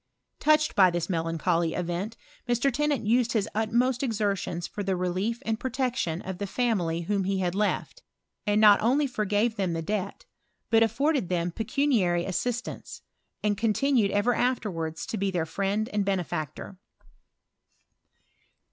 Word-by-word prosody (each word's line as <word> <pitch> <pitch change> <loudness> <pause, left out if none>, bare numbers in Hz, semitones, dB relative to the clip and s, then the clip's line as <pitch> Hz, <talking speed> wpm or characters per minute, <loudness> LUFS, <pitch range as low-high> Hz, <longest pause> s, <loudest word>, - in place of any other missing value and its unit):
Touched 305 0 +3
by 190 -2 +7
this 175 +1 -2
melancholy 165 0 0
event, 180 +6 -3 0.3
Mr. 240 +3 +2
Tennant 295 -3 0
used 235 +2 +2
his 215 -3 +1
ttt 220 +1 -1
most 250 +1 +2
exertions 200 -8 -1
for 205 - -6
the 190 -1 0
relief 185 +6 -2
and 220 0 -1
protection 250 -10 -2
of 190 -1 -6
tlie 200 - -3
femily 175 -10 0
whom 200 0 0
he 195 0 0
had 180 -2 0
lefi, 210 - -1 0.5
and 205 0 +3
not 210 -2 +7
only 265 +7 +3
forgave 215 -2 0
then 190 -4 0
the 165 - -2
debt, 200 +1 -3 0.5
but 225 0 +5
afforded 275 - +1
them 175 -1 0
pecnaiary 220 - +1
a^ietance, 245 +6 -4 0.4
and 205 -2 +1
continued 230 0 +2
ever 205 +5 +2
afterwards 180 -11 -1
to 240 -4 -4
be 200 0 0
their 175 -4 -1
friotd 200 +5 -1
and 205 -1 +1
benefactor. 180 -2 -3
205 Hz, 145 wpm, -27 LUFS, 180-235 Hz, 0.5 s, by